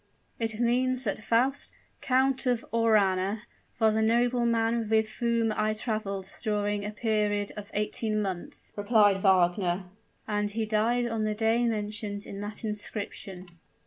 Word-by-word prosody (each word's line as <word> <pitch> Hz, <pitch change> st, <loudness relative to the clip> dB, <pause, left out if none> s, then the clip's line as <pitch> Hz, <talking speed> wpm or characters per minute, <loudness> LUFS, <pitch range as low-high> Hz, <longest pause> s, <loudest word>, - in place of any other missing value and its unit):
"It 225 Hz, -1 st, -2 dB
means 255 Hz, +2 st, +2 dB
that 215 Hz, -1 st, -2 dB
Faust, 255 Hz, +6 st, +1 dB, 0.3 s
Count 265 Hz, 0 st, +2 dB
of 245 Hz, -2 st, +1 dB
Aurana, 210 Hz, -3 st, +2 dB, 0.4 s
was 220 Hz, -1 st, +4 dB
a 220 Hz, -, +2 dB
nobleman 235 Hz, -1 st, +2 dB
with 220 Hz, 0 st, +3 dB
whom 230 Hz, -2 st, +1 dB
I 215 Hz, 0 st, +1 dB
traveled 200 Hz, -4 st, -3 dB
during 205 Hz, -2 st, -1 dB
a 205 Hz, -, -3 dB
period 210 Hz, -2 st, 0 dB
of 205 Hz, 0 st, -8 dB
eighteen 215 Hz, +1 st, 0 dB
months," 190 Hz, -4 st, -5 dB
replied 205 Hz, -2 st, +3 dB
Wagner; 180 Hz, -1 st, +3 dB, 0.4 s
"and 210 Hz, -1 st, 0 dB
he 220 Hz, +2 st, -2 dB
died 225 Hz, +3 st, +1 dB
on 225 Hz, -2 st, -1 dB
the 215 Hz, 0 st, -1 dB
day 225 Hz, +2 st, +2 dB
mentioned 210 Hz, -2 st, -3 dB
in 195 Hz, -, -7 dB
that 205 Hz, +2 st, -6 dB
inscription." 205 Hz, -3 st, -5 dB
215 Hz, 140 wpm, -28 LUFS, 205-230 Hz, 0.4 s, was